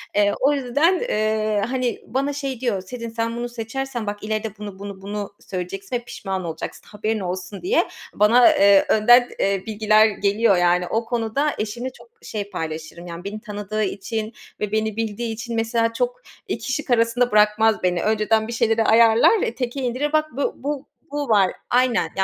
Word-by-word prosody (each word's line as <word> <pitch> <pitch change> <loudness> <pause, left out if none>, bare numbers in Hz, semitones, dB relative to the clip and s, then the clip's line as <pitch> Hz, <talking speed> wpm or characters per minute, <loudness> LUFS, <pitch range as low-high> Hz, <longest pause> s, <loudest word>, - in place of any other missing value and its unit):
Eee, 205 0 +3
o 280 +2 +3
yüzden, 290 +7 +2
eee, 215 -1 0
hani, 255 -2 -1
bana 275 +3 -1
şey 275 -4 -4
diyor, 230 -7 -1
"Sezin 230 +4 -7
sen 230 0 -2
bunu 240 0 -3
seçersen 240 0 -4
bak 205 0 -4
ileride 215 -1 -3
bunu, 205 -2 -8
bunu, 200 -1 -8
bunu 205 0 -5
söyleyeceksin 195 +4 -5
ve 240 - -2
pişman 195 -6 -5
olacaksın, 165 -2 -6
haberin 215 +1 -2
olsun." 185 +2 -5
diye 410 +7 +2 0.3
bana, 235 +4 +6
eee, 200 -1 +6
önden, 240 +3 +6
eee, 195 -1 +1
bilgiler 215 0 +4
geliyor, 205 -1 +2
yani. 175 0 +2
O 225 +3 -1
konuda 240 +5 -1
eşimle 235 +4 -3
çok 360 - -18
şey 205 -2 -5
paylaşırım, 160 +1 -6
yani, 170 +1 -7
beni 210 +2 -6
tanıdığı 210 -1 -3
için 215 +3 -3 0.3
ve 210 -1 -2
beni 220 -1 0
bildiği 225 +1 -2
için 230 +1 -5
mesela 230 0 +1
çok - - -2 0.3
2 260 - -3
şık 300 -1 -3
arasında 235 +1 +2
bırakmaz 210 0 +3
beni. 180 -1 +1
Önceden 220 +1 +2
bir 235 - -5
şeyleri 225 0 +2
ayarlar 230 - +5
ve 235 - -1
teke 250 +2 -3
indirir. 260 +5 -1
Bak 310 0 +3
bu, 280 +4 -1
bu, 290 -1 -3 0.3
bu 290 -2 -3
var. 195 -4 +4 0.2
Aynen. 245 -8 +2
220 Hz, 175 wpm, -22 LUFS, 205-245 Hz, 0.3 s, bana